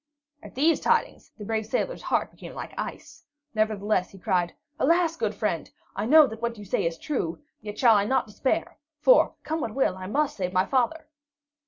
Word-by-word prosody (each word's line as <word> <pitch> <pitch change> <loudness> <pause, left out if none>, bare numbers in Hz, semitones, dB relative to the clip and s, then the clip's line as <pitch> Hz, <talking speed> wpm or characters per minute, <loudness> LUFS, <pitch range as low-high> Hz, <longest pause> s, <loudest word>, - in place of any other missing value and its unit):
At - - -13
these 310 +5 +3
tidings - - 0
the 210 - -8
brave 220 0 -2
sailor's 380 - -2
heart - - 0
became - - -11
like - - -7
ice; - - -7 0.3
nevertheless, 215 -3 0
he 195 - -14
cried: 180 -3 0 0.2
"Alas, 335 -1 +3
good 215 -7 -2
friend, 200 -6 -2 0.3
I 205 +3 -2
know 310 +3 +8
that 225 -3 -7
what 235 -1 -2
you 205 - -9
say 180 - 0
is 165 0 -4
true, 180 - -2 0.2
yet 210 0 -7
shall 235 -3 +6
I 200 -1 +3
not 265 +5 +1
despair; 215 +5 -2 0.2
for, - - +5
come 315 +1 -2
what 220 -5 -4
will, 265 -9 +2
I 185 0 -7
must 290 +7 0
save 180 -2 -2
my 185 0 +3
father!" 270 +7 0
220 Hz, 195 wpm, -26 LUFS, 200-275 Hz, 0.3 s, know